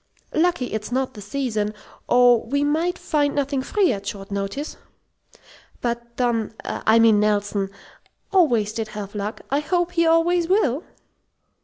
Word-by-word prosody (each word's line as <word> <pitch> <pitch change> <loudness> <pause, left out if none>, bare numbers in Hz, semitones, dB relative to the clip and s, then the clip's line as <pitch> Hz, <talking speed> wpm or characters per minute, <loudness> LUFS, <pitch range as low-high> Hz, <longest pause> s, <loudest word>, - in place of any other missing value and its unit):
Lucky 330 -7 +1
it's 220 +1 -4
not 260 +1 -1
the 210 - -10
season, 215 -2 -2 0.3
or 245 -2 +5
we 285 +5 0
might 320 +5 0
find 290 -2 0
nothing 280 -1 0
free 370 - +2
at 200 -1 -6
short 200 -1 -6
notice. 200 +9 -3 1.0
But 235 0 -4
Don 230 -3 0
I 220 +1 +2
mean 225 -2 +5
Nelson 205 -1 0 0.6
always 235 - +3
did 225 -1 -3
have 200 -1 -6
luck. 210 +1 -4
I 280 - +3
hope 350 +3 0
he 335 -1 +2
always 330 +1 +3
will!" 335 - +2
245 Hz, 145 wpm, -23 LUFS, 215-305 Hz, 1.0 s, or